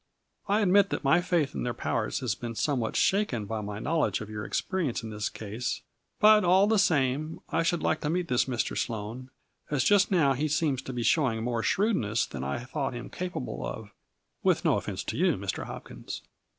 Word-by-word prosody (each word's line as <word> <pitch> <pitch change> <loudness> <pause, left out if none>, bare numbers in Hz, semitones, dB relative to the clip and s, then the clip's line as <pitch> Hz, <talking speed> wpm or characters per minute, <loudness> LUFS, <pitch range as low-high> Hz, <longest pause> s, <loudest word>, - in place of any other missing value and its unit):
I 205 +2 +3
admit 200 0 +5
that - - -3
my 160 +6 +4
faith 170 -5 +1
in - - -4
their 120 -1 -2
powers 115 +4 -1
has 125 -5 0
been 115 +2 -6
somewhat 125 -3 0
shaken 190 - +2
by 110 +1 -3
my 105 0 -5
knowledge 145 - 0
of 110 0 -7
your 105 -1 -4
experience 170 - -1
in 110 - -6
this 105 0 -2
case, 110 +3 -4 0.4
but 215 0 +7
all 185 +3 +5
the 215 0 +3
same, 155 -3 +1
I 165 - +1
should 170 0 0
like 155 - +1
to 150 - -1
meet 175 +1 0
this 125 -5 +2
Mr. 120 -5 -2
Sloane, 115 +3 -4 0.4
as 145 -4 +1
just 200 +4 +4
now 155 -8 +4
he 145 +4 -1
seems 150 -3 +1
to 135 - -6
be 120 -1 -2
showing 120 -6 +2
more 120 -1 -1
shrewdness 115 - +1
than 65 -2 -6
I 70 - -3
thought 135 -1 -3
him 120 - -7
capable 175 - -4
of, 105 - -6 0.5
with - - +2
no - - +4
offense - - -3
to - - -4
you, - - +3
Mr. - - -3
Hopkins." - - -8
135 Hz, 205 wpm, -28 LUFS, 115-175 Hz, 0.5 s, but